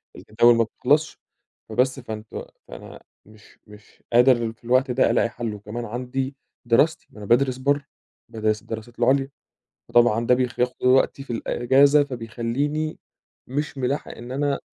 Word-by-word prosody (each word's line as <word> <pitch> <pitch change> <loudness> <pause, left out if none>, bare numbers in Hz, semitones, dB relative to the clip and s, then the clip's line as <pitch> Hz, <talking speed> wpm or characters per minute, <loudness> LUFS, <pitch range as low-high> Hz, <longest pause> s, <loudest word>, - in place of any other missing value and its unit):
الجداول 120 +2 +3
ما 115 - +3
بتخلصش. 145 +7 0 0.5
فبس، 130 +4 +1
فأنتم 110 -2 -7 0.2
فأنا - - -11 0.3
مش 105 0 -20
مش 105 0 -18
قادر 120 -2 +4
في 115 - -35
الوقت 130 +2 +2
ده 125 - +3
ألاقي 115 0 +2
حَل 115 -1 -5
وكمان 105 +4 -7
عندي 130 +4 -4 0.3
دراستي، 140 +7 +2
ما - - -18
أنا 105 - -8
بادرس 130 +1 +2
برّه، 140 +1 0 0.4
بادرس 110 -1 -1
الدراسات 115 +2 -8
العُليا. 135 +3 +2 0.6
فطبعًا 120 -1 +3
ده 125 - +5
بيخ 125 -1 -2
بياخُد 125 +1 0
كل - - -1
وقتي 130 +2 +3
في 120 - -6
الإجازة، 140 +5 +3
فبيخلّيني 130 +5 -3 0.5
مش 145 +2 -4
مِلاحق 135 +3 -2
إن 120 +2 -9
أنا 140 0 -1
125 Hz, 150 wpm, -23 LUFS, 115-135 Hz, 0.6 s, ده